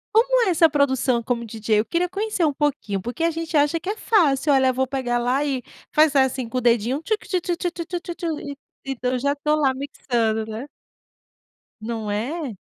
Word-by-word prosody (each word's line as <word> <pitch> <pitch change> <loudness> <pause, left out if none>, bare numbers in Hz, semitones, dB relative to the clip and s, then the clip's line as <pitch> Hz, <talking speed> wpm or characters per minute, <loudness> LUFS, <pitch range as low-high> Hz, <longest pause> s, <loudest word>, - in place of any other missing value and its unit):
Como - - +4
é - - +3
essa 325 -1 +5
produção 265 -4 +2
como 235 0 -2
DJ? 215 -1 0
Eu - - -6
queria 345 +9 0
conhecer 395 -2 -1
um 295 - +1
pouquinho, 275 -10 -1
porque 240 - -6
a 335 0 +3
gente 325 -1 -2
acha 295 +3 +2
que 370 - -5
é 430 - -2
fácil: 300 - +3
"Olha, 265 -1 +4
vou 260 +1 0
pegar 245 -3 -1
lá, 250 +4 +1
e 270 -3 -1 0.3
fazer 300 -2 +4
assim 260 -2 +1
com 255 - -4
o - - 0
dedinho: 240 +4 +2
tchu-tchu-tchu-tchu-tchu-tchu" 350 -4 -3
E 285 -1 -7 0.3
,então, 255 -2 -2
eu 255 - 0
já 280 +2 0
tô 300 +1 +1
lá 270 -3 +2
mixando, 235 -5 -1
né. 220 +6 -6 1.1
Não 220 -2 -4
é? 250 - -3
280 Hz, 185 wpm, -23 LUFS, 240-330 Hz, 1.1 s, essa